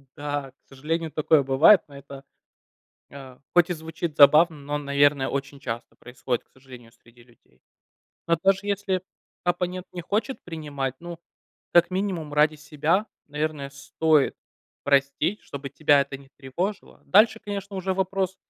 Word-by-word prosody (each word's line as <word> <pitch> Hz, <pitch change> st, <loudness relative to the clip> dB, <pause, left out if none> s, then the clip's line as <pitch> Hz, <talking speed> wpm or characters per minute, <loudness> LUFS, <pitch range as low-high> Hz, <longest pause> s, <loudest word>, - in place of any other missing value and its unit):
Да, 145 Hz, -2 st, -4 dB
к -, -, -47 dB
сожалению, 160 Hz, +4 st, -3 dB
такое 155 Hz, 0 st, +3 dB
бывает, 140 Hz, +9 st, +6 dB
но 140 Hz, -, -13 dB
это, 140 Hz, 0 st, -11 dB, 0.9 s
э, 135 Hz, -2 st, -12 dB, 0.2 s
хоть 175 Hz, 0 st, +4 dB
и -, -, 0 dB
звучит 160 Hz, -1 st, -6 dB
забавно, 155 Hz, +3 st, +6 dB
но, 145 Hz, +1 st, -4 dB
наверное, 140 Hz, -1 st, +2 dB
очень 140 Hz, 0 st, -4 dB
часто 120 Hz, -3 st, -6 dB
происходит, 125 Hz, 0 st, -4 dB
к -, -, -44 dB
сожалению, 125 Hz, -3 st, -15 dB
среди 120 Hz, +1 st, -22 dB
людей. 115 Hz, -, -28 dB, 0.7 s
Но 170 Hz, 0 st, +3 dB
даже 195 Hz, 0 st, +3 dB
если 200 Hz, -2 st, -1 dB, 0.4 s
оппонент 180 Hz, +1 st, -2 dB
не 175 Hz, -, -6 dB
хочет 215 Hz, +8 st, -2 dB
принимать, 145 Hz, -6 st, -4 dB
ну, 170 Hz, 0 st, -8 dB, 0.5 s
как 175 Hz, +1 st, +5 dB
минимум 185 Hz, -5 st, -3 dB
ради 150 Hz, +1 st, +3 dB
себя, 150 Hz, +7 st, 0 dB, 0.2 s
наверное, 150 Hz, -1 st, -3 dB
стоит 145 Hz, +1 st, +1 dB, 0.5 s
простить, 140 Hz, +7 st, +1 dB
чтобы 140 Hz, -1 st, -8 dB
тебя 145 Hz, 0 st, +3 dB
это 140 Hz, 0 st, -8 dB
не 135 Hz, -1 st, -18 dB
тревожило. 175 Hz, +10 st, -5 dB
Дальше, 220 Hz, +3 st, +5 dB
конечно, 200 Hz, -1 st, -6 dB
уже 190 Hz, 0 st, -2 dB
вопрос, 190 Hz, 0 st, -1 dB
150 Hz, 145 wpm, -25 LUFS, 140-180 Hz, 0.9 s, бывает